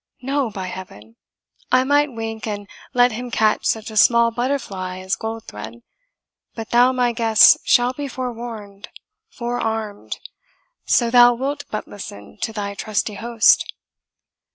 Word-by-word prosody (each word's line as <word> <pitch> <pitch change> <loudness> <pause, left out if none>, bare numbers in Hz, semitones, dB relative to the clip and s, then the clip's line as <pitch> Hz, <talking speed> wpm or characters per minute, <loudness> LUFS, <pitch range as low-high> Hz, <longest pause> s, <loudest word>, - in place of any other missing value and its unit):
No, 275 -1 0
by 195 -3 -6
Heaven! 115 - -10 0.6
I 255 0 +5
might 290 +1 +2
wink, 225 -1 -5
and 205 -1 -5 0.2
let 245 0 +4
him 245 +3 -5
catch 220 -2 +1
such 220 0 -1
a - - -9
small 235 +4 +5
butterfly 225 -7 -3
as 185 +1 -2
Goldthred; 120 - -7 0.7
but 225 -1 -7
thou, 245 +2 +5
my 250 -2 +1
guest, 225 -2 +6
shall 245 0 +3
be 285 +2 -5
forewarned, 230 -6 -7 0.4
forearmed, 225 -3 -4 0.7
so 235 -2 +2
thou 245 0 +7
wilt 280 +4 -3
but 215 - -5
listen 105 - -10
to - - -2
thy 205 -2 -4
trusty 210 +1 -2
host." 230 +2 +3
225 Hz, 135 wpm, -21 LUFS, 205-245 Hz, 0.7 s, thou